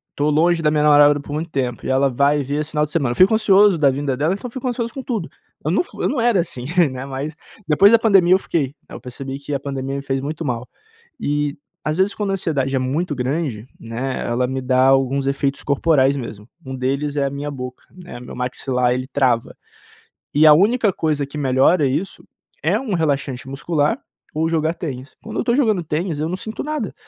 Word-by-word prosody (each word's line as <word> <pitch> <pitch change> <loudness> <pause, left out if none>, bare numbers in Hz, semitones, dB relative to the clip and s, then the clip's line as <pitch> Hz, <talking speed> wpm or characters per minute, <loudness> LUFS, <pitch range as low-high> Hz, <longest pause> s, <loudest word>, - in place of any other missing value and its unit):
tô 145 +1 +1
longe 165 +3 +3
da 150 - +3
minha 150 -1 +2
namorada 145 -1 +6
por 145 - -10
muito 160 +2 -3
tempo, 125 -5 -3
e - - -2
ela 135 +1 +3
vai 140 +3 +2
vir 145 +3 -2
esse 155 - -6
final 150 -1 +1
de 150 - -10
semana. 140 -8 0
Eu - - -10
fico 190 - +5
ansioso 205 -3 +5
da 145 -3 +4
vinda 135 -1 -2
dela, 155 +6 +1
então 235 +5 -6
fico 260 +1 -5
ansioso 235 -1 -2
com 270 - -5
tudo. 220 -10 -3 0.4
Eu 155 - +1
não 190 - +3
f - - -20
eu - - +1
não 275 - -1
era 235 -5 +3
assim, 125 -7 -7 0.3
né, 130 0 -6
mas 140 +3 -5 0.3
depois 175 +6 +6
da 230 - +7
pandemia 195 -5 +5
eu - - +6
fiquei. 145 -7 -2
Aí - - -9
eu - - -14
percebi 135 +2 -7
que 145 +1 -6
a 140 - 0
pandemia 135 -1 -4
me 140 - -3
fez 135 -1 -1
muito 155 +3 -4
mal. 125 -2 -3 0.5
E 145 0 -1 0.3
às 155 - 0
vezes 190 +2 +2
quando 205 -2 -2
a - - 0
ansiedade 140 -7 -1
é - - +2
muito 145 +5 -1
grande, 130 -3 -2
né, 120 +4 -4
ela 120 +2 0
me 130 0 -3
dá 130 +1 +3
alguns 135 0 +2
efeitos 140 0 -1
corporais 140 -1 +2
mesmo, 110 -4 -8 0.2
um 130 0 -5
deles 140 +3 -2
é 140 - +2
a - - 0
minha 140 +1 -5
boca, 125 -2 -7
né, 180 -8 -10
meu 125 - -10
maxilar 125 0 -1
ele 130 +1 -3
trava. 130 -4 0 0.8
E 150 - +5
a 150 - +9
única 210 +5 +3
coisa 150 -4 -1
que 140 +2 -8
melhora 140 +3 +3
isso 155 +9 -3 0.4
é 190 +8 +2
um 240 -7 -3
relaxante 140 -5 -1
muscular, 145 +2 0 0.4
ou 160 +1 0
jogar 160 0 0
tênis. 135 -6 -7
Quando - - -6
eu - - -3
tô 235 - +2
jogando 220 -9 +2
tênis 160 0 -2
eu 155 - -1
não 180 - -2
sinto 220 +3 -6
nada, 300 -8 -3
145 Hz, 225 wpm, -20 LUFS, 135-170 Hz, 0.8 s, a